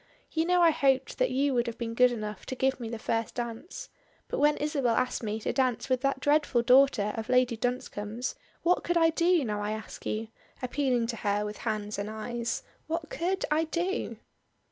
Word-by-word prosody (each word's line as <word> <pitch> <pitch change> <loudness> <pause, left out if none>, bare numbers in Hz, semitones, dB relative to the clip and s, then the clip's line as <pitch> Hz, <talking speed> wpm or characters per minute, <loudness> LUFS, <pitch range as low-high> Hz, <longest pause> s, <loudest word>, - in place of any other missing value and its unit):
You 320 0 +1
know 360 0 +4
I 335 - +7
hoped 270 -3 +1
that - - +3
you 275 +1 +1
would 240 -1 +1
have 230 - -4
been 230 -1 -3
good 250 +1 +5
enough 210 -3 -5
to 260 - -3
give 265 +1 +1
me 230 -2 -5
the 230 - -4
first 225 0 -2
dance, 240 - -5 0.4
but - - -2
when 295 +1 +4
Isabel 280 -6 +1
asked 255 - 0
me 215 -1 -2
to - - -1
dance 255 -3 +1
it - - -13
with 255 -1 +2
that 275 -1 0
dreadful 290 -3 +2
daughter 250 -5 +5
of 225 +1 -5
Lady 250 -1 +3
Dunscombe's, 240 -1 -3 0.3
what 355 +1 +3
could 345 0 +1
I 325 -1 +5
do, 340 -2 +3
now 210 -2 -2
I 210 +1 -1
ask 220 0 -8
you?" 220 +1 -2 0.3
appealing 250 -2 0
to 230 0 -3
her 205 0 0
with 210 0 -5
hands 210 -2 -3
and 200 +1 -3
eyes. 230 +2 -3 0.2
"What 320 0 -3
could 375 +3 -1
I 315 +2 +3
do?" 355 +6 -2
250 Hz, 210 wpm, -29 LUFS, 225-295 Hz, 0.4 s, I